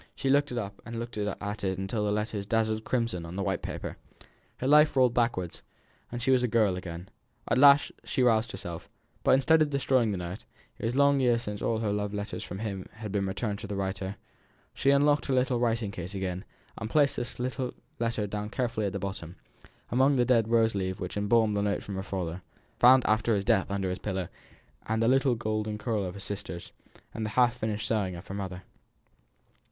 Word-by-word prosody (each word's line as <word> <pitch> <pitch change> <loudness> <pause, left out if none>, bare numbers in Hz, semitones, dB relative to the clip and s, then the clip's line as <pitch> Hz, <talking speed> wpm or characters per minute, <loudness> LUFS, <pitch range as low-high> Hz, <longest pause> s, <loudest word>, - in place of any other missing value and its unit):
She 135 - 0
took 145 +1 +3
it 120 - -3
up 100 -3 -5
and 115 0 -7
looked 120 +1 -5
at 105 -1 -2 0.3
it 95 +1 -2
till 105 +1 -1
the 105 - +1
letters 105 -1 -2
dazzled 110 0 +1
crimson 115 -9 -1
on 85 +2 -7
the 100 - -1
white 95 -1 -1
paper. - - -5 0.6
Her - - -4
life 150 +2 +6
rolled 130 -3 +4
backwards, 115 -8 0 0.5
and 120 0 -4
she 135 - +3
was 130 -1 +4
a 125 - +2
girl 110 -5 +2
again. 90 -1 -7 0.4
At - - +2
last 140 +1 +7
she 130 - 0
roused 115 -2 +3
herself; 85 -3 -7 0.3
but - - +5
instead 160 +4 +4
of 155 - +3
destroying 130 -4 +2
the 100 - -2
note 90 +2 -6 0.4
it - - -4
was 115 +2 -1
long 140 0 +4
years 120 -2 +2
since 105 0 -5
all 115 - +1
her 110 -2 -1
love 105 0 -2
letters 100 +1 -4
from 95 - -6
him 100 -3 -4
had 105 -2 -7
been 100 -1 0
returned 100 +1 -2
to 105 - -7
the 100 - -4
writer 95 0 -3 0.6
she 135 - +1
unlocked 145 +1 +4
her 135 - +1
little 125 -1 +2
writing 115 -3 0
case 90 +1 -6
again, 95 0 -3 0.3
and 110 - -4
placed 145 0 +3
this 120 -1 -4
letter 125 0 -2 0.3
carefully 115 -3 0
down 105 +1 -4 0.4
at 95 - -4
the - - -1
bottom, 95 -4 -5 0.6
among 135 +3 +4
the 125 -2 +3
dead 115 -4 +3
rose 115 -1 +3
leaves 95 -2 -2
which 90 - -5
embalmed 105 +1 +2
the 100 - +1
note 100 0 0
from 100 - -6
her 95 - -3
father, 95 -3 -4 0.4
found 130 +1 +7
after 110 +1 +2
his 100 -1 -1
death 110 -5 +2
under 100 -1 -1
his 90 - -3
pillow, 95 -4 -3 0.6
the 110 +1 +2
little 130 0 +3
golden 110 -1 -2
curl 105 -2 -1
of 90 0 -5
her - - -8
sister's, 95 -3 -6 0.4
the 110 -1 -3
half 120 +2 +3
finished 110 -2 -2
sewing 100 -5 0
of 85 - -9
her - - -7
mother. 95 -2 -5
110 Hz, 210 wpm, -29 LUFS, 95-120 Hz, 0.6 s, last